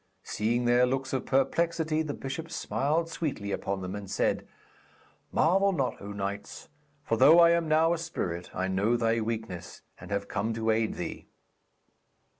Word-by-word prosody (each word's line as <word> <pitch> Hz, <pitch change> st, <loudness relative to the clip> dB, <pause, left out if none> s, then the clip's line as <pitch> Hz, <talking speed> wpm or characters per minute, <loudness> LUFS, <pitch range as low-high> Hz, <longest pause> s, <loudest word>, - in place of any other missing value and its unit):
Seeing 120 Hz, +3 st, -1 dB
their 120 Hz, +1 st, +4 dB
looks 135 Hz, +1 st, -2 dB
of 130 Hz, -, -2 dB
perplexity, 160 Hz, +3 st, +1 dB
the 150 Hz, -2 st, -3 dB
bishop 135 Hz, +5 st, -5 dB
smiled 160 Hz, 0 st, -1 dB
sweetly 145 Hz, -11 st, -3 dB
upon 95 Hz, 0 st, -2 dB
them, 90 Hz, +1 st, -4 dB
and 100 Hz, -2 st, -7 dB
said: -, -, 0 dB, 0.8 s
'Marvel 195 Hz, +5 st, +3 dB
not, 135 Hz, -8 st, -2 dB
O 100 Hz, +1 st, -7 dB
knights, 100 Hz, 0 st, -5 dB, 0.3 s
for 115 Hz, -, 0 dB
though 160 Hz, +9 st, +7 dB
I 170 Hz, 0 st, +7 dB
am 170 Hz, -1 st, +2 dB
now 160 Hz, +2 st, +4 dB
a 170 Hz, -, -2 dB
spirit, 90 Hz, -, -4 dB
I 95 Hz, +1 st, -2 dB
know 100 Hz, +5 st, +1 dB
thy 115 Hz, 0 st, +1 dB
weakness, 110 Hz, -6 st, -5 dB, 0.2 s
and -, -, -11 dB
have 100 Hz, 0 st, -2 dB
come 110 Hz, +2 st, -2 dB
to 110 Hz, 0 st, +1 dB
aid 110 Hz, 0 st, 0 dB
thee.' -, -, -6 dB
120 Hz, 165 wpm, -28 LUFS, 105-160 Hz, 0.8 s, though